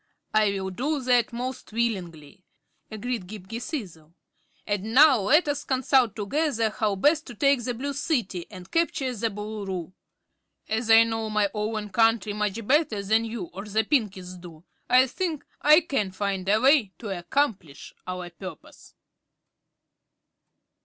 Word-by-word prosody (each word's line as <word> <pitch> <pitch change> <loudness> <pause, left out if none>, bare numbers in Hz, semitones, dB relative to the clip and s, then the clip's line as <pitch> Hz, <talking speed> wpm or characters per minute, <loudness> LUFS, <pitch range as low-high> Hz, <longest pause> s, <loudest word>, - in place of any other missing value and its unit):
"I 215 -1 +4
will 190 -1 -3
do 285 +10 -1
that 245 -2 +3
most 255 +1 -5
willingly," 185 -7 -3 0.5
agreed 220 -2 -4
Ghip 205 -1 -9
Ghisizzle. 200 - -7 0.5
"And 205 +3 -3
now 285 -3 +7
let 295 - +3
us 285 0 -1
consult 260 -4 +2
together 230 +1 0
how 210 -2 -1
best 300 - +2
to 240 - -9
take 275 +1 +2
the 245 +1 -3
Blue 280 +4 -4
City 240 - -2
and 185 -3 -12
capture 275 -6 0
the 230 +1 -1
Boolooroo. 200 -4 -5 0.7
As 220 +1 -2
I 225 0 +8
know 225 -1 -3
my 210 -2 +1
own 210 0 -3
country 225 -2 +2
much 210 +1 -2
better 260 -6 +2
than 220 +3 +2
you 225 -6 -6
or 195 - -6
the 215 +1 0
Pinkies 190 - -2
do, 165 -2 -12 0.3
I 255 +1 +6
think 315 +3 -4 0.2
I 305 +3 +7
can 275 - -1
find 190 0 -3
a 210 +2 +4
way 260 -7 +4
to 220 - -7
accomplish 175 - -2
our 180 -1 -5
purpose." 185 +3 -11
220 Hz, 145 wpm, -26 LUFS, 195-255 Hz, 0.7 s, I